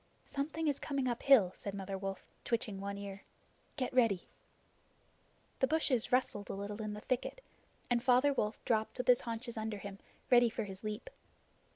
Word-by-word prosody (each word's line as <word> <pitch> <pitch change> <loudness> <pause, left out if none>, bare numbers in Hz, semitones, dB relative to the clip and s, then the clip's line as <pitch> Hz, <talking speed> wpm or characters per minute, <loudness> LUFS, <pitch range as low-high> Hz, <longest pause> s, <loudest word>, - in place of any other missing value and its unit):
"Something 310 +3 -2
is 285 -2 +1
coming 275 -3 -1
uphill," 240 -5 +5
said 200 -1 -5
Mother 195 0 -4
Wolf, 195 0 -4 0.2
twitching 215 -4 -1
one 200 0 -3
ear. 200 -1 -7 0.5
"Get 255 -3 -2
ready." 225 -8 +4 1.4
The 265 - +4
bushes 285 -6 +1
rustled 245 -5 +1
a - - -3
little 205 +2 -5
in 215 -1 -3
the 210 - -7
thicket, 255 - -2 0.5
and 240 -1 +2
Father 260 +3 +5
Wolf 210 -4 -2
dropped 220 -2 +1
with 250 - -2
his 250 -1 +6
haunches 230 0 -4
under 220 -1 -2
him, 200 -1 -8 0.3
ready 240 -1 +7
for 225 0 -3
his 195 -1 -8
leap. 215 - -4
225 Hz, 170 wpm, -34 LUFS, 200-255 Hz, 1.4 s, ready